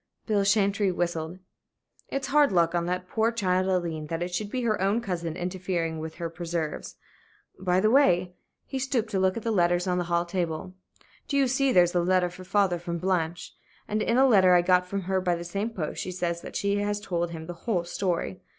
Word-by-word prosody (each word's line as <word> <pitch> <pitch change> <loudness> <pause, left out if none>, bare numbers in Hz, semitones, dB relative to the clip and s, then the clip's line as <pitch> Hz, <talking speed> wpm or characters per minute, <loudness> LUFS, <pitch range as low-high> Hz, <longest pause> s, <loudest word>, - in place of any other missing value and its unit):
Bill 210 -3 +2
Chantrey 200 -1 +2
whistled. 170 -1 -2 0.7
"It's 275 0 -3
hard 295 -2 +4
luck 170 -2 +3
on 170 -1 0
that 180 +1 -2
poor 225 +3 +1
child 185 -4 +1
Aileen 170 -4 -1
that 165 +2 -2
it 175 0 -5
should 205 +3 -2
be 250 +2 -2
her 215 -4 0
own 200 +4 +2
cousin 175 -7 -4
interfering 175 -3 -2
with 160 0 -6
her 170 - -4
preserves. 165 -2 -4 0.6
By 185 -1 +2
the 215 +3 +3
way" 180 -10 +4 0.3
he 270 - -4
stooped 250 -4 -1
to 195 - 0
look 190 +2 +2
at 230 - -5
the 230 - 0
letters 175 -2 +2
on 180 -1 0
the 175 - -1
hall 170 0 +1
table 175 0 -3 0.5
"do 280 - 0
you 275 -1 +4
see 270 +1 +2
there's 175 -5 +4
a 175 - +2
letter 180 0 +2
for 185 +1 -11
father 185 -2 +1
from 170 0 -4
Blanche? 170 -2 -2 0.3
And 215 +1 -1
in 230 - +1
a 265 - +6
letter 190 -7 +6
I 175 - +4
got 180 0 +3
from 200 +1 -3
her 190 +1 0
by 180 -1 +1
the 170 - -6
same 200 +6 -3
post, 180 -9 -4
she 185 - -4
says 170 -1 -2
that - - -9
she 200 0 0
has 205 0 -1
told 175 -4 -2
him 160 -1 -7
the 175 - -6 0.2
whole 180 -6 +1
story. 180 +1 -2
180 Hz, 220 wpm, -27 LUFS, 175-205 Hz, 0.7 s, a